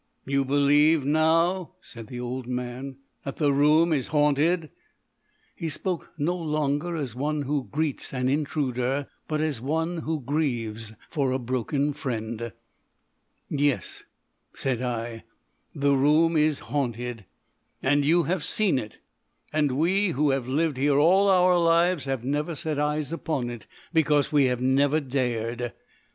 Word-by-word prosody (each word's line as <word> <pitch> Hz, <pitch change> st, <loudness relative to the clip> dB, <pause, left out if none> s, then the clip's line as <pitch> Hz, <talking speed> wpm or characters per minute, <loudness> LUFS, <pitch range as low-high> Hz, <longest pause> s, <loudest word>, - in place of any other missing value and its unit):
"You 140 Hz, 0 st, +1 dB
believe 145 Hz, +2 st, +3 dB
now," 165 Hz, +4 st, +2 dB
said 115 Hz, -9 st, -11 dB
the 125 Hz, -, -7 dB
old 125 Hz, 0 st, -4 dB
man, 125 Hz, +2 st, -4 dB, 0.3 s
"that 135 Hz, -, -5 dB
the 145 Hz, -3 st, +2 dB
room 155 Hz, +4 st, +4 dB
is 135 Hz, -4 st, 0 dB
haunted?" 150 Hz, +2 st, +2 dB, 0.8 s
He 165 Hz, -, -4 dB
spoke 175 Hz, +3 st, -2 dB
no 160 Hz, +4 st, 0 dB
longer 155 Hz, 0 st, -1 dB
as 140 Hz, -8 st, -3 dB
one 145 Hz, +4 st, -2 dB
who 140 Hz, -1 st, -2 dB
greets 155 Hz, -2 st, -2 dB
an 125 Hz, -1 st, -1 dB
intruder, 140 Hz, -2 st, -1 dB, 0.2 s
but 155 Hz, -1 st, -1 dB
as 150 Hz, -7 st, -1 dB
one 160 Hz, +6 st, -1 dB
who 160 Hz, -1 st, -2 dB
grieves 120 Hz, -6 st, -2 dB, 0.2 s
for 140 Hz, -5 st, 0 dB
a 130 Hz, -, +1 dB
broken 130 Hz, +4 st, -1 dB
friend. 115 Hz, -5 st, -4 dB, 1.0 s
"Yes," 140 Hz, -, -1 dB, 0.5 s
said 125 Hz, -3 st, -1 dB
I; 115 Hz, -2 st, -4 dB, 0.5 s
"the 140 Hz, 0 st, +2 dB
room 150 Hz, +5 st, +3 dB
is 155 Hz, -1 st, +3 dB, 0.2 s
haunted." 120 Hz, -5 st, -2 dB, 0.6 s
"And 145 Hz, +2 st, +3 dB
you 170 Hz, +4 st, +3 dB
have 170 Hz, +1 st, -1 dB
seen 185 Hz, -5 st, +1 dB
it. 110 Hz, -3 st, -8 dB, 0.6 s
And 150 Hz, -3 st, +2 dB
we, 190 Hz, +6 st, +2 dB
who 150 Hz, -3 st, +1 dB
have 135 Hz, -2 st, -1 dB
lived 150 Hz, +1 st, 0 dB
here 140 Hz, +1 st, +2 dB
all 190 Hz, +7 st, +5 dB
our 180 Hz, -1 st, +5 dB
lives, 170 Hz, -1 st, +3 dB
have 135 Hz, -3 st, -2 dB
never 150 Hz, +4 st, -1 dB
set 155 Hz, -1 st, -3 dB
eyes 150 Hz, +1 st, -1 dB
upon 140 Hz, -7 st, -2 dB
it. 120 Hz, -3 st, -9 dB, 0.3 s
Because 150 Hz, -3 st, +3 dB
we 145 Hz, -3 st, +4 dB
have 125 Hz, -1 st, 0 dB
never 140 Hz, +4 st, +3 dB
dared.... 120 Hz, -3 st, -2 dB
145 Hz, 145 wpm, -26 LUFS, 130-155 Hz, 1.0 s, all